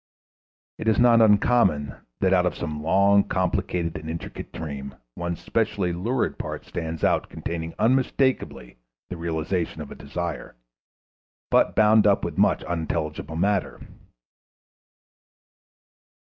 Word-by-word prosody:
It - - -5
is 110 -2 +3
not 120 -1 +6
uncommon 100 - +3 0.3
that 95 0 +3
out 90 -1 +3
of 85 - -2
some 75 -3 -4
long, 100 +5 +4
complicated 90 -2 -1
and 80 0 -8
intricate 85 +1 -7
dream 70 -4 -6 0.2
one 85 +4 -3
specially 90 +2 -1
lucid 115 +9 -1
part - - -5
stands 80 -1 -5
out - - +2
containing 80 -1 -5
unmistakably 125 - 0 0.3
the 90 - -4
realization 85 +1 -2
of 75 -2 -7
a - - -8
desire, 80 -1 -5 1.0
but - - +3
bound 110 0 +5
up 100 - +3
with - - -4
much - - +3
unintelligible 80 -2 -3
matter. 95 +2 0
85 Hz, 120 wpm, -24 LUFS, 80-100 Hz, 1.0 s, not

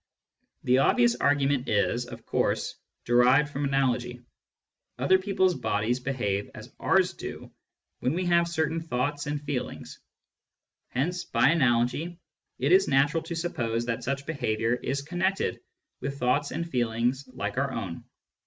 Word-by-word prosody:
The 125 +1 +4
obvious 120 -3 +4
argument 140 -1 +1
is, 120 +3 +1
of 120 -1 -10
course, - - 0 0.3
derived 125 +5 +4
from 140 +1 -1
analogy. 125 -3 0 0.8
Other 190 0 +4
people's 190 -1 +2
bodies 115 -3 -1
behave 120 -7 -2
as - - -11
ours - - +3
do - - -8 0.5
when 130 - 0
we 185 +1 -1
have 170 -1 +3
certain 165 -1 -1
thoughts 145 0 -2
and 150 0 -1
feelings; 145 -3 -5 0.9
hence, 175 +8 -1
by 115 +3 +3
analogy, 135 +3 +1 0.4
it 140 +5 0
is 190 +2 +6
natural 145 +4 +3
to 170 +1 -6
suppose 120 -9 -2
that 115 -1 -2
such 140 +1 -2
behaviour 115 -7 0
is 135 +3 -2
connected 180 +5 -1 0.4
with 140 +2 -4
thoughts 140 +3 +1
and 170 - -3
feelings 120 0 -1
like 105 +4 -2
our 140 0 0
own. 100 -9 -5
135 Hz, 140 wpm, -27 LUFS, 120-160 Hz, 0.9 s, is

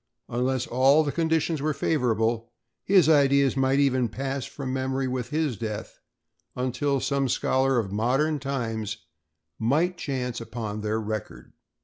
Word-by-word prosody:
Unless 125 +1 0
all 135 +5 +4
the 145 - -1
conditions 160 -1 0
were 155 0 0
favorable, 115 -5 0 0.3
his 185 -5 +5
ideas 140 -3 +4
might 135 0 +2
even 130 -4 +2
pass 135 +3 -3
from 130 -3 -5
memory 130 0 -1
with 125 -1 -3
his 150 -6 -1
death, 105 -1 -5 0.6
until 135 +2 0
some 140 0 0
scholar 130 +2 +1
of 105 -5 -1
modern 135 +9 +1
times 115 -6 -3 0.6
might 160 +10 +1
chance 125 -4 -3
upon 110 -3 -5
their 110 +1 -1
record. 110 -1 -6
130 Hz, 135 wpm, -26 LUFS, 115-140 Hz, 0.6 s, his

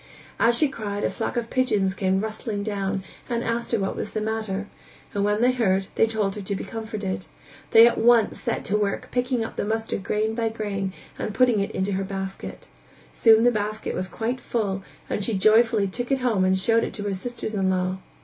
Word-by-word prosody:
As 235 0 +4
she 300 - +4
cried 210 -6 -4
a - - +1
flock - - -3
of 230 -1 -2
pigeons 210 -7 +2
came 190 -1 +1
rustling 215 -1 -3
down 200 -2 -2 0.3
and 235 -1 -1
asked 230 +1 -2
her 230 - +3
what 195 -2 -2
was - - -5
the 215 - -1
matter, 215 -2 -2 0.5
and 200 - 0
when 210 +1 +1
they 250 +1 +5
heard, 195 -6 +1
they 225 - +3
told 215 -3 0
her 210 - -6
to 200 +1 -3
be - - -4
comforted; 215 -5 -4 0.4
they 225 +1 +9
at 235 - +3
once 230 -1 +4
set - - -2
to 200 - 0
work 205 -1 -1
picking 250 -2 0
up - - -9
the - - 0
mustard 220 -1 -2
grain 215 +2 0
by 225 0 0
grain 205 -3 -3 0.3
and 210 - -3
putting 250 -4 +4
it 200 - 0
into 190 +2 -2
her 195 0 -1
basket; 195 0 -6 0.5
soon 225 -1 +6
the 245 - +5
basket 215 0 -2
was 185 0 -3
quite 235 +7 -3
full 200 -5 -1 0.3
and 205 - -2
she 220 +1 0
joyfully 215 +2 +4
took 240 +7 -4
it 270 -1 +2
home 220 -7 +2
and 190 0 +3
showed 225 +4 +3
it - - -3
to 205 - -4
her 205 -1 -1
sisters 220 +3 -5
in 195 -2 +1
law. 185 0 0
215 Hz, 215 wpm, -25 LUFS, 195-230 Hz, 0.5 s, they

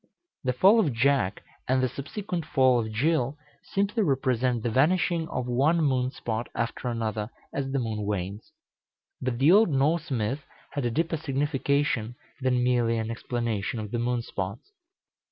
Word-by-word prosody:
The 125 -1 +1
fall 195 - +6
of 160 - +2
Jack, 115 -5 +1 0.2
and 130 0 +2
the - - +3
subsequent 170 - -4
fall 130 -3 +3
of 110 -1 -3
Jill, 140 +3 +1 0.2
simply 200 +3 0
represent 130 - +1
the 120 - 0
vanishing 165 +5 +2
of 125 - -3
one 135 +7 +2
moon 130 -4 +2
spot 115 -3 -4
after 115 +2 -2
another, 110 -2 -2 0.2
as 135 -1 -2
the 135 - 0
moon 110 -4 -2
wanes. 100 +1 -4 0.7
But 125 -2 -1
the 140 +6 +5
old 210 +1 +6
Norse 150 +3 +1
myth 130 +3 -1 0.3
had 140 -3 -2
a - - +2
deeper 165 +6 0
signification 140 -4 0 0.3
than 125 -1 +2
merely 120 -2 +2
an 110 0 -2
explanation 115 -1 -2
of 105 -1 -6
the 120 - -1
moon 120 0 0
spots. 100 - -5
130 Hz, 160 wpm, -27 LUFS, 115-145 Hz, 0.7 s, fall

